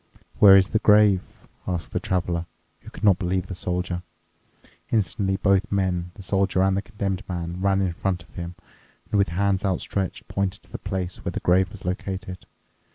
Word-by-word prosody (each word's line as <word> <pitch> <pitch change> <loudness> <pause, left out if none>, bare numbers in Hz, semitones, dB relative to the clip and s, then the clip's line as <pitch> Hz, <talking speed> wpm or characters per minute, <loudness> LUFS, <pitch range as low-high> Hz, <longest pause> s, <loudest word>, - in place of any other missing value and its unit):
"Where 95 -2 +9
is 95 -1 +4
the 110 - +1
grave?" 105 -3 +5 0.5
asked 90 -2 -3
the - - -1
Traveler, 85 -2 -1 0.3
who - - -12
could - - -12
not 100 -4 +5
believe 90 -1 -1
the 95 - -6
Soldier. 90 0 -2 0.9
Instantly 100 -2 0
both 100 +2 +2
men, 90 -3 0
the 100 - -10
Soldier 95 0 +1
and 95 0 +3
the 100 - 0
Condemned 100 -3 -3
Man, 85 0 -4
ran 100 0 +2
in 95 -3 0
front 90 0 -2
of 80 - -24
him 85 0 -6 0.6
and 105 - +2
with 100 - +3
hands 95 +2 +1
outstretched 95 -1 -2
pointed 100 0 -2
to - - -21
the - - -6
place 95 -3 -4
where - - -3
the - - -2
grave 95 +2 +3
was 100 -3 -12
located. 95 0 -4
95 Hz, 185 wpm, -24 LUFS, 90-100 Hz, 0.9 s, Where